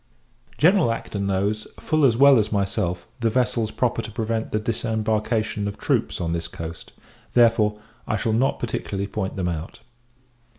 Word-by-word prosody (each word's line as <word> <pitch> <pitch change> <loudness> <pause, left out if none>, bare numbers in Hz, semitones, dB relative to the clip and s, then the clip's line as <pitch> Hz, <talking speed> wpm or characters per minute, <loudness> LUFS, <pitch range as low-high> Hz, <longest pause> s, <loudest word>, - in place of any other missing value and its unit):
General 170 - +4
[Acton] 105 -3 -5
knows, 100 +3 -1
full 155 -2 +2
as 115 -3 +3
well 140 -1 +7
as 105 - 0
myself, 95 -3 -1
the 115 -1 +2
vessels 120 -2 +1
proper 120 +1 0
to - - -7
prevent 110 0 -2
the - - +1
disembarkation 110 -1 -1
of 100 - -5
troops 70 0 0
on 85 -2 -1
this 85 0 -2
coast; 85 -1 -8 0.4
therefore, 115 -3 +4 0.3
I 110 - 0
shall 110 +2 0
not 125 +5 +2
particularly 100 0 -3
point 100 -1 -4
them 95 -2 -1
out. 85 0 -5
110 Hz, 160 wpm, -23 LUFS, 100-115 Hz, 0.4 s, well